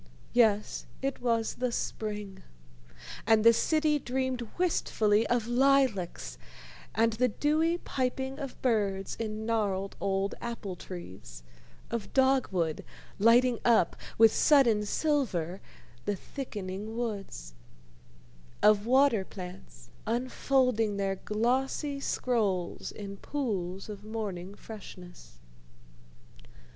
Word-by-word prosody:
Yes, 215 Hz, -4 st, +2 dB, 0.2 s
it 275 Hz, 0 st, -2 dB
was 230 Hz, -2 st, +1 dB
the 250 Hz, 0 st, -2 dB
spring, 210 Hz, -4 st, -4 dB, 0.9 s
and 220 Hz, -1 st, +5 dB
the 230 Hz, 0 st, +8 dB
city 305 Hz, +3 st, +2 dB
dreamed 260 Hz, -1 st, -2 dB, 0.2 s
wistfully 225 Hz, -, +2 dB
of 240 Hz, -2 st, +1 dB
lilacs 240 Hz, -, +1 dB, 0.6 s
and 225 Hz, +2 st, +3 dB
the 250 Hz, +3 st, +2 dB
dewy 310 Hz, +7 st, +1 dB
piping 265 Hz, -2 st, -2 dB
of 275 Hz, -3 st, -6 dB
birds 200 Hz, -6 st, 0 dB
in 220 Hz, -1 st, -3 dB
gnarled 200 Hz, -4 st, -1 dB
old 195 Hz, 0 st, 0 dB
apple 230 Hz, -6 st, -5 dB
trees, 95 Hz, -, -9 dB, 0.5 s
of 230 Hz, -3 st, -3 dB
dogwood 255 Hz, -, +2 dB, 0.4 s
lighting 235 Hz, +3 st, +5 dB
up 235 Hz, -2 st, +4 dB, 0.2 s
with 225 Hz, -1 st, +7 dB
sudden 235 Hz, -9 st, +4 dB
silver 200 Hz, -, 0 dB, 0.4 s
the 205 Hz, -, 0 dB
thickening 210 Hz, -2 st, -6 dB
woods, 195 Hz, -, -4 dB, 1.1 s
of 210 Hz, 0 st, +5 dB
water 260 Hz, -5 st, +4 dB
plants 180 Hz, -, -10 dB, 0.2 s
unfolding 245 Hz, -2 st, +1 dB
their 195 Hz, -1 st, -1 dB
glossy 260 Hz, +7 st, -1 dB
scrolls 210 Hz, -10 st, -1 dB
in 200 Hz, -1 st, -8 dB
pools 195 Hz, -9 st, -3 dB
of 205 Hz, -1 st, -8 dB
morning 205 Hz, -4 st, -5 dB
freshness. 180 Hz, -, -11 dB
220 Hz, 100 wpm, -29 LUFS, 195-255 Hz, 1.1 s, the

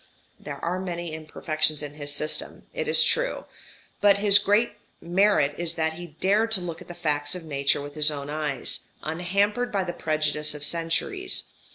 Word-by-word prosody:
There 145 Hz, -1 st, -7 dB
are 180 Hz, +2 st, -1 dB
many 175 Hz, -3 st, -4 dB
imperfections 155 Hz, -1 st, 0 dB
in 145 Hz, -1 st, -6 dB
his 145 Hz, -1 st, -2 dB
system, 150 Hz, +1 st, -2 dB
it -, -, -3 dB
is 480 Hz, -, +7 dB
true; -, -, 0 dB, 0.6 s
but 200 Hz, -1 st, +6 dB
his 205 Hz, 0 st, +5 dB
great 205 Hz, +3 st, +2 dB, 0.3 s
merit 175 Hz, -4 st, +3 dB
is 170 Hz, -1 st, -1 dB
that 160 Hz, -1 st, 0 dB
he 170 Hz, -2 st, -10 dB
dared 210 Hz, +4 st, +3 dB
to 205 Hz, -, +3 dB
look 170 Hz, -2 st, -6 dB
at -, -, -12 dB
the 175 Hz, -, -8 dB
facts 150 Hz, -2 st, 0 dB
of 175 Hz, -2 st, -7 dB
Nature 140 Hz, -2 st, +1 dB
with 145 Hz, 0 st, -8 dB
his 150 Hz, 0 st, +5 dB
own 140 Hz, -2 st, -3 dB
eyes, 150 Hz, -3 st, -2 dB, 0.2 s
unhampered 200 Hz, +8 st, 0 dB
by 195 Hz, -2 st, 0 dB
the 175 Hz, -1 st, -4 dB
prejudice 155 Hz, -2 st, 0 dB
of 150 Hz, -, -6 dB
centuries. 165 Hz, -, -1 dB
165 Hz, 180 wpm, -26 LUFS, 150-190 Hz, 0.6 s, is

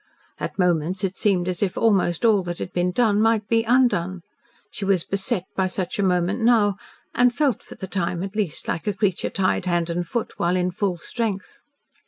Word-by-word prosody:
At -, -, -5 dB
moments 180 Hz, 0 st, +1 dB
it 190 Hz, 0 st, -1 dB
seemed 185 Hz, -4 st, +1 dB
as 180 Hz, -1 st, -2 dB
if 195 Hz, -2 st, 0 dB
almost 195 Hz, -3 st, +2 dB
all 215 Hz, -4 st, +5 dB
that 175 Hz, -1 st, -4 dB
had -, -, -6 dB
been 180 Hz, 0 st, +1 dB
done 210 Hz, -1 st, +2 dB
might 220 Hz, -2 st, +2 dB
be 230 Hz, -1 st, +3 dB
undone. 225 Hz, -7 st, +2 dB, 0.5 s
She -, -, -6 dB
was 195 Hz, -3 st, +2 dB
beset 195 Hz, 0 st, -1 dB
by 190 Hz, -1 st, +1 dB
such 185 Hz, +1 st, -3 dB
a -, -, +3 dB
moment 185 Hz, +3 st, +1 dB
now, 220 Hz, -4 st, +3 dB, 0.4 s
and 245 Hz, 0 st, +4 dB
felt 270 Hz, -3 st, 0 dB
for -, -, -12 dB
the -, -, -6 dB
time, 180 Hz, -2 st, -2 dB
at 195 Hz, +1 st, -6 dB
least, 205 Hz, -8 st, -2 dB
like 165 Hz, -, -3 dB
a 205 Hz, -, +1 dB
creature 195 Hz, -3 st, 0 dB
tied 185 Hz, -1 st, 0 dB
hand 175 Hz, -1 st, 0 dB
and 175 Hz, 0 st, -2 dB
foot 235 Hz, +6 st, -3 dB
while 175 Hz, +1 st, +1 dB
in 180 Hz, 0 st, 0 dB
full 185 Hz, -1 st, -1 dB
strength. 200 Hz, +3 st, -4 dB
190 Hz, 205 wpm, -23 LUFS, 180-215 Hz, 0.5 s, all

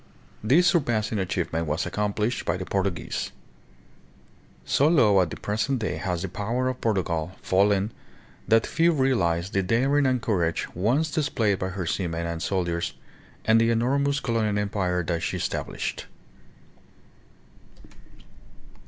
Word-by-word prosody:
This 145 Hz, +12 st, +4 dB
surpassing 115 Hz, -, +1 dB
achievement 85 Hz, -3 st, -2 dB
was 75 Hz, +4 st, -1 dB
accomplished 105 Hz, +3 st, -1 dB
by 85 Hz, -, -1 dB
the 95 Hz, -, -5 dB
Portuguese. 95 Hz, -3 st, -2 dB, 1.3 s
So 140 Hz, -, +3 dB
low 110 Hz, -, +5 dB
at 90 Hz, -, 0 dB
the -, -, -6 dB
present 110 Hz, +6 st, -1 dB
day 110 Hz, -4 st, -2 dB
has 90 Hz, -2 st, -2 dB
the -, -, -2 dB
power 115 Hz, +7 st, -2 dB
of 130 Hz, -, -5 dB
Portugal 90 Hz, -6 st, -1 dB
fallen 100 Hz, +2 st, +2 dB, 0.6 s
that 115 Hz, 0 st, +4 dB
few 170 Hz, +1 st, +2 dB
realize 95 Hz, -, +1 dB
the 100 Hz, -, +1 dB
daring 135 Hz, +8 st, +2 dB
and 130 Hz, -1 st, +2 dB
courage 90 Hz, -10 st, 0 dB
once 130 Hz, -, +1 dB
displayed 115 Hz, -11 st, 0 dB
by 95 Hz, -, -2 dB
her 95 Hz, -1 st, -4 dB
seamen 85 Hz, -1 st, -2 dB
and 85 Hz, -1 st, -4 dB
soldiers 85 Hz, -3 st, -1 dB, 0.5 s
and 110 Hz, +1 st, +5 dB
the 115 Hz, -, +3 dB
enor 120 Hz, +5 st, +2 dB
mous 140 Hz, +1 st, +1 dB
colonial 110 Hz, -5 st, 0 dB
empire 95 Hz, -3 st, -1 dB
that 85 Hz, 0 st, -2 dB
she -, -, -2 dB
established. -, -, -3 dB
105 Hz, 135 wpm, -25 LUFS, 90-125 Hz, 1.3 s, low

